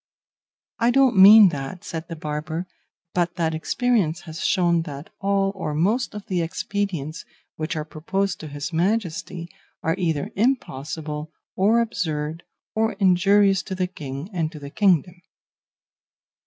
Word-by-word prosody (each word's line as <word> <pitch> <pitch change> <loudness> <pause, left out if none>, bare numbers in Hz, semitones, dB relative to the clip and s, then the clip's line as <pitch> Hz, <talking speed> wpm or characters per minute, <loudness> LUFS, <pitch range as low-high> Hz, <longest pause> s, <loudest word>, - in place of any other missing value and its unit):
"I 235 +1 +3
don't 260 -1 +4
mean 200 +1 +9
that," 145 +3 -6
said 160 0 -6
the 165 - -6
barber, 155 +2 -4 0.5
"but 175 -1 0
that 165 -2 0
experience 190 -1 0
has 160 -1 -7
shown 175 -3 +2
that 145 -2 -8
all 195 -1 +1
or 160 -6 -4
most 210 +10 +1
of 210 - -7
the 180 -3 -1
expedients 165 -3 -3 0.3
which 155 +1 -3
are 155 -1 -3
proposed 185 +5 -2
to 155 - -7
his 145 +3 -6
Majesty 175 -2 -1 0.4
are 160 - +2
either 160 -5 -1
impossible, 155 - -2 0.2
or 215 +5 +4
absurd, 160 -7 -2 0.3
or 220 0 +1
injurious 195 +1 +4
to 190 - -6
the 185 0 0
King 150 -1 -7
and 165 -3 -1
to 160 - -10
the 140 -1 -9
kingdom." 180 -3 +2
175 Hz, 140 wpm, -23 LUFS, 155-200 Hz, 0.5 s, mean